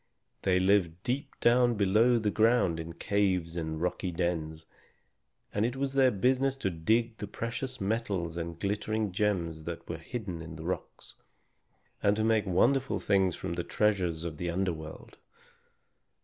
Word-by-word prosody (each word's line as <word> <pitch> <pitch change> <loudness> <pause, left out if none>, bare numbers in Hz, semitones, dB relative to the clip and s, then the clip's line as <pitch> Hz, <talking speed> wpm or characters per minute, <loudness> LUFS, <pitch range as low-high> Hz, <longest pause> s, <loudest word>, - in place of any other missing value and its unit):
They 95 -1 +3
lived 90 -3 +2
deep 130 +4 -3
down 120 0 +4
below 110 +4 +4
the 105 -2 0
ground 110 -7 +3
in 80 +1 -6
caves 95 -5 0
and 80 -2 -3
rocky 90 +2 -1
dens, 80 -2 -2 0.9
and 105 - +1
it 120 +3 0
was 135 0 -2
their 135 -1 +5
business 130 +5 +1
to 95 -8 -1
dig 110 +7 +1
the 105 - -5
precious 125 +5 -4
metals 100 -5 -1
and 85 -1 -5
glittering 105 +1 -1
gems 90 -5 -1
that 85 -1 -6
were 85 -1 -5
hidden 95 -2 -5
in 80 0 -8
the 80 - -8
rocks, 95 - -5 0.9
and 100 0 +3
to 110 - 0
make 110 -2 +2
wonderful 130 +9 +2
things 95 -3 +2
from 85 - -4
the 85 0 -2
treasures 90 -7 0
of 80 -3 -5
the 85 +1 -3
under 90 +1 0
world. 80 0 -10
95 Hz, 160 wpm, -30 LUFS, 85-115 Hz, 0.9 s, their